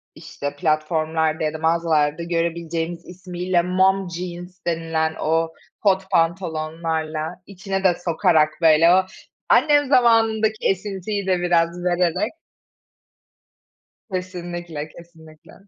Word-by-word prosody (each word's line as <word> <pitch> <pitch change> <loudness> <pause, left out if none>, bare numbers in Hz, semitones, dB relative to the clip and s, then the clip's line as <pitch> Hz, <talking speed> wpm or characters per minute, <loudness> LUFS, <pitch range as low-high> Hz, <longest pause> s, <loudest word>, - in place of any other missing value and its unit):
işte 145 0 -6
platformlarda 160 -1 0
ya 155 - -1
da - - -4
mağazalarda 160 -1 +1
görebileceğimiz 170 0 -2
ismiyle 180 0 -2
mom 190 +1 +2
jeans 175 +1 -7
denilen 165 -1 -1
o 165 +1 0 0.3
kot 190 -2 +1
pantolonlarla, 160 -1 -1
içine 195 0 -4
de 180 -2 +4
sokarak 160 -2 +3
böyle 165 +1 +6
o 190 0 +4 0.5
annem 290 -2 +4
zamanındaki 225 -4 +3
esintiyi 195 +1 -2
de 185 -1 +2
biraz 175 0 +1
vererek 180 +3 0 1.8
Kesinlikle 175 -4 -5
kesinlikle. 160 -2 -16
170 Hz, 100 wpm, -22 LUFS, 160-185 Hz, 1.8 s, böyle